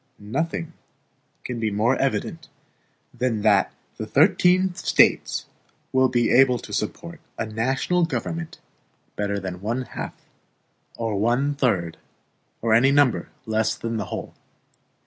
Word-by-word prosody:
Nothing 160 +9 -3 0.7
can 125 -2 -4
be 110 -1 0
more 110 +5 +2
evident 150 +4 -2 0.6
than 120 -4 -1
that 105 -3 +4 0.3
the 110 - -5
thirteen 180 - +4
States - - +2 0.5
will 130 0 +4
be 120 -2 +1
able 125 -1 +5
to - - -10
support 85 - -4 0.2
a - - -1
national 130 +11 0
government 165 0 -4 0.6
better 100 -1 -1
than 95 -2 -6
one 115 +5 -2
half, - - -7 0.8
or 110 -3 -2
one 125 +7 +1
third, 100 - 0 0.7
or 115 -1 +3
any 120 +4 +5
number 140 -3 +3 0.2
less 110 0 0
than 115 0 -4
the 105 - -2
whole. - - -6
120 Hz, 125 wpm, -24 LUFS, 110-140 Hz, 0.8 s, able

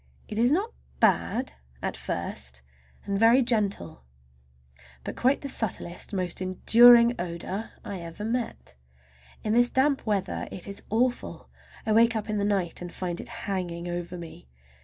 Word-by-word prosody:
It 210 - -4
is 240 +3 +4
not 400 +9 0 0.3
bad—at 65 - -1
first, 65 -2 -4 0.4
and 200 0 -1
very 235 +4 +6
gentle, 200 - 0 1.0
but - - -6
quite 260 +3 +2
the 280 - -5
subtlest, 200 -8 -1
most 185 -3 -1
enduring 235 +6 +6
odor 180 +5 -5
I 195 - -5
ever 170 +5 -7
met. 230 - -3 0.7
In 215 - 0
this 240 +1 +5
damp 270 +1 +2
weather 200 -3 -1
it 185 - -6
is 200 0 -5
awful. 245 +3 -1 0.4
I 220 - 0
wake 230 +1 +4
up 215 0 -3
in 210 - -1
the 200 - 0
night 195 -5 0
and 175 -1 -6
find 175 -2 -3
it - - -9 0.2
hanging 175 -3 -3
over 175 0 -4
me. 165 - -11
200 Hz, 150 wpm, -27 LUFS, 175-235 Hz, 1.0 s, very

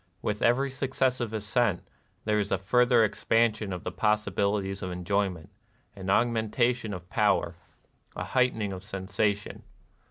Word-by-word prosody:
With 105 0 -2
every 130 +3 +2
succes 130 -1 0
sive 120 -4 -3
ascent 105 -1 0 0.4
there 105 0 +2
is 100 -1 -2
a - - +3
further 120 +4 +4
expansion 110 0 +1
of 90 -1 -5
the 90 - -3
possibilities 100 -1 0
of 95 - -3
enjoyment, 90 -1 -2 0.4
an 95 -1 -6
augmentation 115 +1 +1
of 90 -2 -7
power, 105 -5 +2 0.6
a - - -3
heightening 115 -6 0
of 95 0 -8
sensation. 100 +1 -2
105 Hz, 135 wpm, -28 LUFS, 95-120 Hz, 0.6 s, further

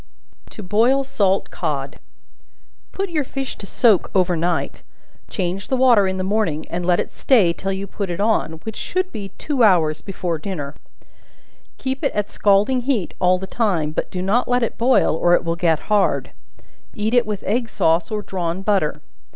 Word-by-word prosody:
To 215 - -9
Boil 235 +8 +2
Salt 200 -7 0
Cod. - - -4 0.9
Put 390 -2 -3
your 305 -3 0
fish 270 0 -5
to 200 - -8
soak 220 -5 +3
over 180 -2 +3
night; 170 +1 -2 0.5
change 185 +1 -3
the 260 - 0
water 240 -6 +5
in 190 0 -2
the 185 - -2
morning, 190 -6 0
and 175 +1 -2
let 175 0 +2
it - - -3
stay 205 -11 +3
till 195 +3 -4
you 195 +1 -3
put 200 0 -5
it 175 +1 -4
on, 215 -6 +1
which 220 -1 -6
should 370 0 -2
be 200 -2 -6
two 285 -4 -2
hours 165 -7 +3
before 175 -4 -3
dinner; 150 -6 -5 1.0
keep 265 +3 -4
it 280 - +1
at 205 -1 -1
scalding 210 +6 +2
heat 245 -7 -1
all 180 0 +4
the 190 - -6
time, 190 -8 0
but - - -3
do 180 -1 -4
not 215 +6 +1
let 245 0 +2
it 230 - -2
boil, 245 -7 +3
or 175 +2 +4
it - - 0
will 165 0 -1
get 165 -3 +1
hard; 210 -2 +1 0.6
eat 215 0 -1
it 245 -3 +3
with 210 -2 -4
egg 230 +3 -1
sauce 165 -2 +1
or 210 -1 -3
drawn 180 -1 -3
butter. 195 -7 0
200 Hz, 185 wpm, -21 LUFS, 175-235 Hz, 1.0 s, water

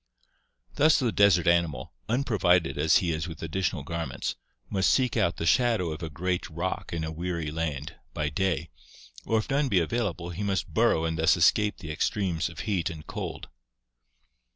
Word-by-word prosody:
Thus 155 +2 +5
the 125 -4 +1
desert 100 -5 +4
animal, 85 -2 +1 0.2
unprovided 105 -9 +2
as 75 +2 +3
he 85 -2 0
is 80 +2 -2
with 80 -2 -8
additional 85 -1 -2
garments, 80 -4 -4 0.3
must 95 -2 +1
seek 125 -3 +2
out 95 -8 +1
"the 80 - -3
shadow 115 -5 +2
of 75 +1 -6
a 80 - -4
great 90 +5 -2
rock 85 +3 -4
in 85 -1 -2
a 80 - -3
weary 85 -1 -3
land 80 -1 -3
" - - -40
by 75 -1 -1
day 85 0 -1 0.6
or 115 - +2
if 110 - -2
none 140 +1 +2
be 100 - +2
available 90 -2 -2
he 85 +4 -6
must 100 -3 -2
burrow 80 - +3
and 80 0 -2
thus 80 +3 +4
escape 105 +5 +3
the 80 -4 -7
extremes 85 +1 -1
of 80 -2 -8
heat 95 -2 -1
and 80 -3 -9
cold. - - -6
85 Hz, 180 wpm, -27 LUFS, 80-100 Hz, 0.6 s, Thus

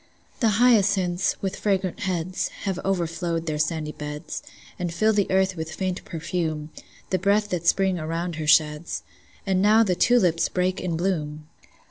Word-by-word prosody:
The 220 -4 +2
hyacinths, 195 -6 +3
with 195 0 -1
fragrant 195 -1 0
heads, 185 -3 -2 0.2
Have 190 -2 -2
overflowed 170 -2 -1
their 155 -2 -2
sandy 155 -1 -1
beds, 150 0 -6 0.4
And 175 -1 -2
fill 215 +6 +2
the 205 -2 +1
earth 190 0 +2
with 160 -1 -5
faint 185 -1 -3
perfume, 160 -2 -3 0.4
The 185 - +2
breath 205 +3 +2
that 170 -3 -2
Spring 190 -1 +3
around 165 +1 -3
her 155 -1 -4
sheds. 150 +1 +2 0.4
And 190 -2 +1
now 215 +3 +6
the 190 -4 +1
tulips 180 -4 +3
break 185 0 0
in 170 -3 -2
bloom! 155 -4 -2
180 Hz, 155 wpm, -24 LUFS, 160-195 Hz, 0.4 s, now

